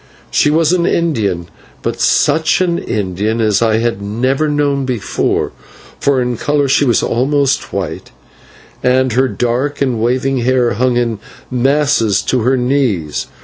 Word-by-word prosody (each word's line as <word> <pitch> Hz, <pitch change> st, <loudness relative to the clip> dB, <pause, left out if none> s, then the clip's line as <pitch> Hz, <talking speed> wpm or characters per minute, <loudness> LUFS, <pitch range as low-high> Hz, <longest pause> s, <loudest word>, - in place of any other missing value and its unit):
She -, -, +3 dB
was 160 Hz, +2 st, +2 dB
an 175 Hz, -1 st, +1 dB
Indian, 105 Hz, -, 0 dB, 0.4 s
but -, -, -3 dB
such 155 Hz, +2 st, +2 dB
an 175 Hz, -2 st, 0 dB
Indian 105 Hz, +2 st, -2 dB
as 105 Hz, -2 st, +2 dB
I 110 Hz, -1 st, +2 dB
had 115 Hz, -3 st, -1 dB
never 130 Hz, +9 st, 0 dB
known 145 Hz, -2 st, 0 dB
before, 125 Hz, -6 st, -1 dB, 0.5 s
for 140 Hz, -2 st, +2 dB
in 125 Hz, -1 st, -1 dB
colour 145 Hz, +2 st, 0 dB
she 135 Hz, +2 st, +3 dB
was 120 Hz, -3 st, +2 dB
almost 140 Hz, +3 st, 0 dB
white, 95 Hz, -4 st, -4 dB, 0.7 s
and 130 Hz, -1 st, +2 dB
her 130 Hz, +3 st, +2 dB
dark 125 Hz, +4 st, -2 dB
and 125 Hz, -5 st, 0 dB
waving 130 Hz, +3 st, 0 dB
hair 125 Hz, 0 st, +1 dB
hung 125 Hz, +2 st, +1 dB
in 115 Hz, -3 st, -1 dB, 0.3 s
masses 130 Hz, -5 st, +2 dB
to 130 Hz, -, 0 dB
her 130 Hz, +4 st, +2 dB
knees. 125 Hz, -, -1 dB
125 Hz, 145 wpm, -15 LUFS, 115-140 Hz, 0.7 s, She